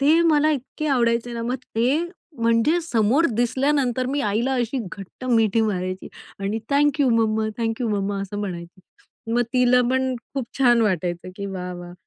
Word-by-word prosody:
ते 305 +4 +5
मला 305 0 +4
इतके 300 +2 -3
आवडायचे 240 -3 +1
ना 230 -1 -4
मग 245 +3 -1 0.2
ते 255 +7 +2 0.4
म्हणजे 230 +9 +3
समोर 265 0 +2
दिसल्यानंतर 255 +1 +1
मी 280 +2 -1
आईला 225 +6 0
अशी 245 +1 -1
घट्ट 200 +5 -10
मिठी 225 -3 +3
मारायची 185 -3 -2 0.3
आणि 200 +2 -2
"thank 290 +1 +3
you 275 - +4
mamma, 220 -1 +2
thank 225 +1 -2
you 240 - 0
mamma," 200 -1 -1
असं 200 +1 -6
म्हणायची. 175 -2 -6 0.5
मग 240 +1 +3
तिला 250 -1 +4
पण 260 0 +1 0.2
खूप 270 -4 -2
छान 240 -3 +5
वाटायचं 180 -3 -1
की, 200 - -4
वाह 180 -2 -5
वाह! 175 0 -9
235 Hz, 170 wpm, -23 LUFS, 205-260 Hz, 0.5 s, ते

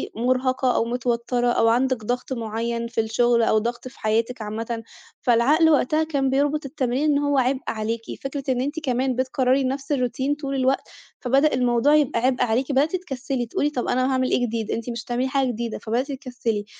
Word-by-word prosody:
مُرهَقة 255 +2 +1
أو - - +2
متوتّرة 240 0 -1
أو 240 -1 +3
عندِك 245 0 +1
ضغْط 250 +3 -2
معيّن 230 0 -3
في 230 -1 0
الشغل 235 +2 +2
أو 220 - +3
ضغْط 235 +3 -2
في 255 - -13
حياتِك 225 +2 0
عامةً، 225 +2 -4 0.4
فالعقل 275 +7 +4
وقتها 305 +1 +3
كان 280 -4 0
بيربُط 285 +2 +1
التمرين 265 -1 -1
إن 285 - +3
هو 285 -1 +1
عِبء 260 +1 +1
عليكِ، 225 +1 -2 0.2
فكرة 275 +1 -4
إن 250 -1 +1
أنتِ 290 +5 -2
كمان 260 -3 0
بتكرّري 260 +1 +1
نَفس 270 +2 -3
الروتين 260 +1 0
طول 275 -2 -4
الوقت 265 0 0 0.3
فبدأ 275 +4 +3
الموضوع 250 +3 +3
يبقى 290 -5 +2
عِبء 255 -1 +2
عليكِ، 245 +4 0
بدأتِ 285 +6 +2
تكسّلي 270 -7 -3
تقولي: 285 +5 0
"طَب 255 -5 -3
أنا 255 +1 +1
هاعمل 260 -1 +1
إيه 245 - +2
جديد؟ 225 -2 -3
أنتِ 230 +1 -3
مش 235 -1 -4
هتعملي 245 +2 -1
حاجة 270 0 +1
جديدة." 235 -1 -3
فبدأتِ 240 +6 -2
تكسّلي، 245 -5 -3
255 Hz, 185 wpm, -23 LUFS, 235-270 Hz, 0.4 s, فالعقل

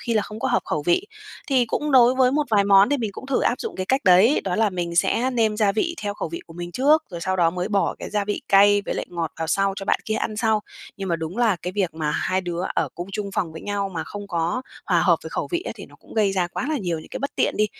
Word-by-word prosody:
khi 235 -2 -2
là 215 - +3
không 210 +2 -8
có - - 0
hợp - - +1
khẩu 155 - -2
vị. 175 - +1 0.4
Thì 260 -3 +3
cũng 295 +5 -2
đối 250 -1 +6
với 255 -1 +4
một 295 0 +1
vài 205 -2 +4
món 200 0 +6
thì 290 - +2
mình 225 -5 -2
cũng 265 - -9
thử 275 - +1
áp 245 - 0
dụng - - -5
cái 185 0 -3
cách 265 +2 +1
đấy 190 +9 +6
đó 185 -2 -1
là 220 -2 +2
mình 170 -2 -3
sẽ 250 +8 +2
nêm 220 -3 +1
gia 205 -3 +2
vị 335 - -1
theo 205 0 -2
khẩu 170 - -4
vị 170 - -6
của 165 - -13
mình 175 +1 -7
trước 300 +4 +4
rồi 170 -1 -6
sau 190 +3 -1
đó 170 -2 +3
mới 180 +3 -3
bỏ 200 -2 +1
cái - - -7
gia 205 -1 0
vị 205 - -3
cay 205 +1 +5
với - - -2
lại - - -3
ngọt 170 -2 -4
vào 160 - -2
sau 195 +3 +1
cho 195 - -5
bạn - - +1
kia 215 - -1
ăn 215 -1 -2
sau, 220 -1 +2 0.4
nhưng 195 -2 -5
mà 170 - +1
đúng 165 +5 -6
là 225 -6 +3
cái 180 +2 -6
việc 185 -5 -1
mà 155 -2 -2
hai 185 +4 0
đứa 175 -1 -4
ở - - 0
cùng 175 +2 -6
chung 200 -1 -3
phòng 165 -4 -2
với 160 - -8
nhau 200 -1 -2
mà 160 -1 -3
không 205 0 -8
có 175 +8 -1 0.2
hòa - - +3
hợp - - +4
về - - -6
khẩu - - -3
vị 350 +1 -1
á, - - -5
thì - - -10
nó - - -18
cũng - - -16
gây 210 -3 +2
ra 185 -2 +1
quá 225 +9 -4
là 305 -3 0
nhiều 175 -5 -2
những - - -11
cái - - -6
bất 280 0 -3
tiện - - +1
đi. 215 - +3
200 Hz, 310 wpm, -23 LUFS, 175-230 Hz, 0.4 s, đối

